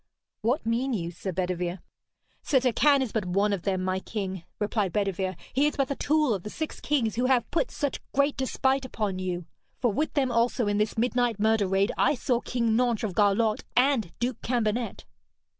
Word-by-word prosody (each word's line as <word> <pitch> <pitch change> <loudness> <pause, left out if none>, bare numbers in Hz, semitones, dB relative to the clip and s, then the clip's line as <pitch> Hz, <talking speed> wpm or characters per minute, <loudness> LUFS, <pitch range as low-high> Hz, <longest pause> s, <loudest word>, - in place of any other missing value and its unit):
'What 245 +7 0
mean 245 +4 0
you, 170 -6 -2
Sir 185 +2 -5
Bedevere?' 180 0 -2 0.6
'Sir 275 - +3
Turquine 265 +3 +3
is 240 - -4
but 220 - -1
one 200 +3 +1
of 195 - -2
them, 185 0 -1
my 185 0 0
king,' 190 -3 -4
replied 210 -2 0
Bedevere. 190 -1 -1 0.2
'He 280 +3 +3
is 300 - -2
but 275 -2 0
the 280 - -1
tool 300 -4 +2
of 195 - -3
the 210 - -7
six 315 +7 -5
kings 235 -8 0
who 245 - +2
have 250 -3 +3
put 335 - +1
such 285 -3 -3
great 280 +1 +2
despite 265 0 0
upon 210 -7 -3
you. 180 -2 -3 0.3
For 240 -4 +1
with 305 +8 -1
them 265 -4 +2
also 235 +1 +2
in 205 0 +1
this 210 +2 0
midnight 245 -1 +1
murder 220 -1 +3
raid 195 +2 +2
I 295 - +4
saw 245 -1 0
King 235 -3 0
Nentres 240 -2 +1
of - - -11
Garlot 210 +2 +2 0.2
and 250 -8 +3
Duke 240 0 -2
Cambenet.' 235 -1 -1
225 Hz, 195 wpm, -27 LUFS, 195-255 Hz, 0.6 s, I